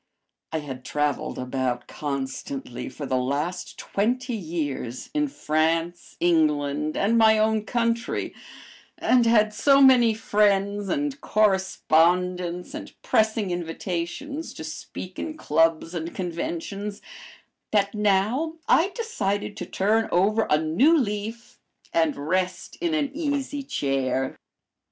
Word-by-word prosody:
I 160 Hz, -1 st, -1 dB
had 130 Hz, -3 st, -7 dB
traveled 145 Hz, +1 st, -1 dB
about 125 Hz, -1 st, -2 dB
constantly 135 Hz, -3 st, -5 dB
for 145 Hz, -, -7 dB
the 130 Hz, -1 st, 0 dB
last 145 Hz, +8 st, -2 dB
twenty 245 Hz, +5 st, -1 dB
years 155 Hz, -, -4 dB
in 300 Hz, -1 st, +1 dB
France, 165 Hz, -, -1 dB
England, 150 Hz, -3 st, +1 dB
and 225 Hz, +4 st, +3 dB
my 220 Hz, -1 st, +6 dB
own 215 Hz, 0 st, +2 dB
country, 230 Hz, 0 st, -1 dB, 0.6 s
and 245 Hz, -2 st, +3 dB
had 215 Hz, -2 st, +4 dB
so 275 Hz, +4 st, +4 dB
many 250 Hz, -5 st, +6 dB
friends 205 Hz, -2 st, +1 dB
and 290 Hz, -2 st, -1 dB
correspondents, 180 Hz, -3 st, +2 dB
and -, -, -7 dB
pressing 220 Hz, -3 st, +2 dB
invitations 175 Hz, -, -4 dB
to -, -, -7 dB
speak 180 Hz, +3 st, -7 dB
in 310 Hz, -1 st, -4 dB
clubs 165 Hz, -, +2 dB
and 165 Hz, -1 st, -4 dB
conventions, 190 Hz, +3 st, -4 dB, 0.7 s
that 200 Hz, -2 st, +2 dB
now 210 Hz, +10 st, +1 dB
I 340 Hz, +4 st, +4 dB
decided 205 Hz, -, -2 dB
to -, -, -5 dB
turn 220 Hz, +3 st, +1 dB
over 210 Hz, +5 st, +2 dB
a 150 Hz, -, +5 dB
new 195 Hz, -, +4 dB
leaf 220 Hz, -1 st, -3 dB, 0.3 s
and 160 Hz, -2 st, +2 dB
rest 180 Hz, +5 st, -2 dB
in 340 Hz, -2 st, +1 dB
an 290 Hz, -3 st, 0 dB
easy 285 Hz, -2 st, -2 dB
chair. 135 Hz, -, -1 dB
190 Hz, 120 wpm, -25 LUFS, 160-230 Hz, 0.7 s, my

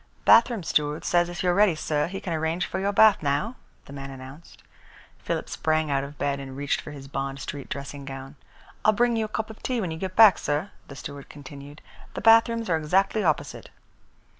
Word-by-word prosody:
"Bathroom 230 Hz, -3 st, +5 dB
steward 150 Hz, -1 st, -1 dB
says 175 Hz, 0 st, +2 dB
if 175 Hz, +1 st, -5 dB
you 180 Hz, -, +3 dB
are -, -, +1 dB
ready, 200 Hz, -3 st, +4 dB
sir, 150 Hz, -1 st, -1 dB
he 195 Hz, +2 st, -6 dB
can 175 Hz, -, -4 dB
arrange 160 Hz, +2 st, -1 dB
for 190 Hz, -, -4 dB
your 200 Hz, +1 st, 0 dB
bath 215 Hz, 0 st, +5 dB
now," 145 Hz, -, -1 dB, 0.3 s
the 140 Hz, -, -12 dB
man 140 Hz, 0 st, -7 dB
announced. 135 Hz, +4 st, -12 dB, 0.6 s
Philip -, -, -3 dB
sprang 155 Hz, -1 st, 0 dB
out 135 Hz, 0 st, +1 dB
of 140 Hz, +1 st, -9 dB
bed 140 Hz, 0 st, -1 dB
and 135 Hz, -1 st, -8 dB
reached 140 Hz, 0 st, -1 dB
for -, -, -10 dB
his 140 Hz, -2 st, -10 dB
Bond 135 Hz, 0 st, -4 dB
Street 140 Hz, 0 st, -7 dB
dressing 140 Hz, +1 st, -6 dB
gown. 135 Hz, +1 st, -8 dB, 0.5 s
"I'll 215 Hz, -, +5 dB
bring 240 Hz, +2 st, +2 dB
you 220 Hz, -1 st, 0 dB
a -, -, -5 dB
cup 220 Hz, +1 st, -4 dB
of 220 Hz, -, -15 dB
tea 255 Hz, -2 st, -1 dB
when 185 Hz, -6 st, -2 dB
you 160 Hz, -, -6 dB
get 185 Hz, 0 st, -5 dB
back, 215 Hz, -5 st, +7 dB
sir," 150 Hz, +7 st, -2 dB, 0.2 s
the 140 Hz, -, -10 dB
steward 140 Hz, 0 st, -9 dB
continued. 145 Hz, 0 st, -11 dB, 0.3 s
"The -, -, -4 dB
bathrooms 230 Hz, +1 st, +4 dB
are 165 Hz, -, +2 dB
exactly 190 Hz, +7 st, +1 dB
opposite." 155 Hz, -4 st, -2 dB
155 Hz, 215 wpm, -25 LUFS, 140-200 Hz, 0.6 s, back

